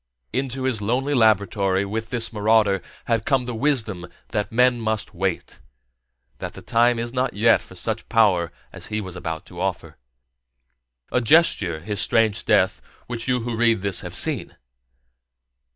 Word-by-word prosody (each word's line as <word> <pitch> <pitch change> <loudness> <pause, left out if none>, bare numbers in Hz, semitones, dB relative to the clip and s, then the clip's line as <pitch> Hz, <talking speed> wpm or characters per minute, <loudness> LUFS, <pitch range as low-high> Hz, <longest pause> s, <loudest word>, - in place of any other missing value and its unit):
Into 130 +1 -2
his 130 -5 0
lonely 130 +7 0
laboratory, 100 -4 +2
with 110 +3 -4
this 115 -1 -1
marauder, 105 -2 +3 0.2
had 115 -2 0
come 130 -1 +1
the 125 - -4
wisdom 110 -8 -1 0.2
that 105 0 -2
men 125 +1 +3
must 110 -2 -2
wait, 95 -1 -3 0.8
that - - -5
the - - -11
time 120 +1 +3
is 120 +1 -4
not 125 -3 -1
yet 115 +2 +4
for 95 - -15
such 110 +4 -4
power 100 -7 +3 0.2
as - - -9
he 110 - -2
was 95 -4 -7
about 80 -3 -5
to 90 0 -9
offer. 95 -2 -3 1.1
A 125 - +2
gesture, 110 - +3
his 105 +3 -2
strange 110 -2 +2
death, - - +2 0.2
which 120 -1 -5
you 125 -1 +1
who 120 0 -3
read 115 -2 +2
this 100 -2 0
have - - -8
seen? - - -2
110 Hz, 160 wpm, -23 LUFS, 100-120 Hz, 1.1 s, yet